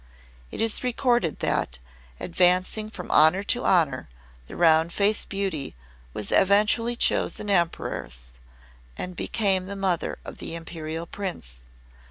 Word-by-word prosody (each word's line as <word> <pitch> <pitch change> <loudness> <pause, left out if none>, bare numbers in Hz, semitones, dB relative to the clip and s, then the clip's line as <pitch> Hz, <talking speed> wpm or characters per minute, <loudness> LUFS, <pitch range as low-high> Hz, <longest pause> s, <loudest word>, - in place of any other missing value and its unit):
It - - -5
is 225 +2 +3
recorded 240 - 0
that, 60 - -1 0.4
advancing 185 +4 +1
from 180 -5 -8
honour 160 +6 +5
to 245 +4 0
honour, 140 - +2 0.4
the - - -10
Round 165 0 +4
Faced 205 +3 +1
Beauty 190 - -3 0.4
was 105 +9 -5
eventually 210 +4 +3
chosen 210 -3 +1
Empress 65 - -2 0.6
and 180 0 -5
became 190 -2 0
the 200 - -5
mother 190 -4 -1
of - - -9
the 165 - -5
Imperial 165 0 -6
Prince. 165 - -4
180 Hz, 125 wpm, -25 LUFS, 160-205 Hz, 0.6 s, honour